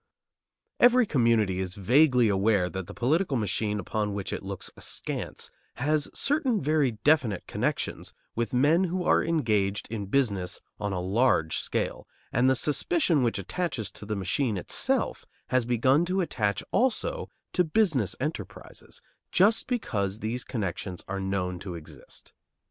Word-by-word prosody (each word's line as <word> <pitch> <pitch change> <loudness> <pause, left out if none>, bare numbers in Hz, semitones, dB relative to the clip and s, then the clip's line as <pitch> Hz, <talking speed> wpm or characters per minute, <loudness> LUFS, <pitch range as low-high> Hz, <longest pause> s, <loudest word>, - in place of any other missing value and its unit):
Every 245 0 +6
community 115 - +2
is 95 0 -3
vaguely 125 - +4
aware 100 -2 +2
that 95 -2 -5
the 100 - -8
political 150 +3 +1
machine 105 -1 -1
upon 105 +2 -2
which 100 -2 -4
it - - -3
looks 95 -1 -6
askance - - -4 0.2
has 150 +3 0
certain 275 -6 +1
very 150 -3 +2
definite 135 - +3
connections - - -2 0.2
with 115 -2 -2
men 150 +9 +4
who 180 +1 -2
are - - +3
engaged 105 -11 0
in 105 -3 -4
business 100 -7 0 0.2
on 105 -1 -2
a 90 - -2
large 95 -3 +2
scale, - - -3 0.3
and 125 +3 +4
the 130 - +4
suspicion 160 - +1
which 115 -4 +1
attaches 115 - -3
to 105 - -10
the 105 - -1
machine 105 +4 0
itself 90 - -1 0.2
has 130 -2 +2
begun 130 +6 +3
to 185 +2 0
attach 105 - -1
also 465 - 0 0.2
to 180 - +3
business 155 - +1
enterprises, 110 - -6 0.3
just 210 +5 +4
because 105 - -1
these 115 +3 -3
connections 95 -4 -4
are 100 +1 -3
known 95 -2 -2
to 90 -1 -6
exist. 80 -2 -12
115 Hz, 145 wpm, -27 LUFS, 100-155 Hz, 0.3 s, Every